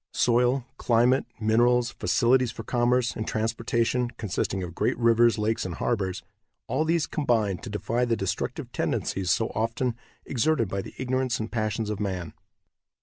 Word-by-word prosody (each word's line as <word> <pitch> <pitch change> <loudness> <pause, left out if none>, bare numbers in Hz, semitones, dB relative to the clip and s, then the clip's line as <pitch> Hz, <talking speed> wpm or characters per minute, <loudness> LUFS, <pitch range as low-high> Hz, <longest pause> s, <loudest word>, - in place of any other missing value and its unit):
Soil, 125 +1 +2
climate, 120 +3 +3
minerals, 120 +2 +3
facilities 125 0 +2
for 115 - -8
commerce 125 +1 +1
and 110 - -4
transportation, 115 +2 0
consisting 95 -2 -2
of 90 -1 -6
great - - 0
rivers, 115 0 +4
lakes 110 +1 0
and 90 -2 -4
harbors, 95 -6 -1 0.4
all 155 - 0
these 165 -1 +2
combine 115 - 0
to 120 - -8
defy 115 +4 -1
the 120 -2 +1
destructive 95 -4 -3
tendencies 95 -2 -1
so 110 +6 +2
often 115 +3 -1 0.3
exerted 130 -3 +1
by 100 +1 -2
the - - -11
ignorance 130 -1 -1
and 110 0 -4
passions 110 -1 -1
of 105 - -4
man. 95 -5 -3
115 Hz, 150 wpm, -26 LUFS, 105-125 Hz, 0.4 s, rivers